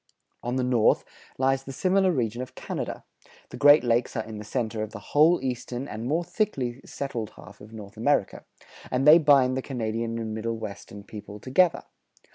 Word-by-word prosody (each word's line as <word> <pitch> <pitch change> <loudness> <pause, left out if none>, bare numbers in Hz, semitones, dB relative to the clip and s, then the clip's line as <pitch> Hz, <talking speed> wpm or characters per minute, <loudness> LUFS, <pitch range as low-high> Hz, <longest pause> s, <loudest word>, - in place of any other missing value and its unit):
On 120 +1 -3
the 130 - 0
north 125 -3 +3 0.3
lies 135 0 +2
the 135 - -8
similar 190 +6 +2
region 120 -5 -1
of 130 - -8
Canada: - - -5 0.5
the - - -9
Great 145 +1 +7
Lakes 120 0 +1
are 110 - -1
in 110 -1 -8
the - - -7
center 110 0 -3
of 110 0 -5
the - - -6 0.2
whole 160 +4 +5
eastern 125 +1 -4
and 115 0 -5
more 160 +5 +1
thickly 135 - -2
settled 120 -6 -5
half 100 0 -14
of 105 +2 -13
North 105 -1 -11
America, 115 -3 0 0.5
and 130 +3 0
they 155 +3 +10
bind 140 -4 +4
the 130 - -1
Canadian 115 -3 -3
and 110 -1 -4
Middle 115 +1 -3
Western 100 -1 -8
people 105 0 -10
together. 160 - +2
120 Hz, 185 wpm, -26 LUFS, 110-135 Hz, 0.5 s, they